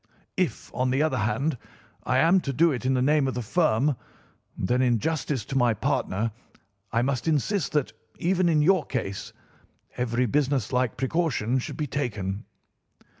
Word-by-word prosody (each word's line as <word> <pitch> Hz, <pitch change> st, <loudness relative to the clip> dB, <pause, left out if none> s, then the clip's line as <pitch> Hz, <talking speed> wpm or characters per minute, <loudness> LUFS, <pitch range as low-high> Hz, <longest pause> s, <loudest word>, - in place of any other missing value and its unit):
If, 175 Hz, -11 st, -2 dB
on 130 Hz, 0 st, 0 dB
the 135 Hz, +4 st, +2 dB
other 140 Hz, -5 st, 0 dB
hand, 130 Hz, +5 st, 0 dB, 0.5 s
I 130 Hz, -, +2 dB
am 170 Hz, +7 st, +5 dB
to 140 Hz, -, -3 dB
do 165 Hz, +5 st, +3 dB
it 130 Hz, -1 st, -2 dB
in 130 Hz, -, +2 dB
the 125 Hz, -, +2 dB
name 145 Hz, 0 st, +3 dB
of 130 Hz, -, -2 dB
the 125 Hz, -, -2 dB
firm, 145 Hz, 0 st, +2 dB, 0.6 s
then 125 Hz, +7 st, +1 dB
in 125 Hz, -2 st, +3 dB
justice 145 Hz, -3 st, -2 dB
to 135 Hz, -, -6 dB
my 120 Hz, -4 st, +3 dB
partner 115 Hz, -3 st, -1 dB, 0.6 s
I 115 Hz, +2 st, +2 dB
must 130 Hz, +2 st, -1 dB
insist 160 Hz, +3 st, 0 dB
that, 135 Hz, -7 st, 0 dB, 0.2 s
even 180 Hz, 0 st, +2 dB
in 155 Hz, -2 st, +3 dB
your 185 Hz, 0 st, +4 dB
case, 100 Hz, -7 st, -4 dB, 0.7 s
every 125 Hz, 0 st, +1 dB
businesslike 130 Hz, -2 st, 0 dB
precaution 130 Hz, -3 st, 0 dB
should -, -, -6 dB
be 150 Hz, -, -1 dB
taken. 105 Hz, -8 st, -3 dB
130 Hz, 165 wpm, -26 LUFS, 120-150 Hz, 0.7 s, am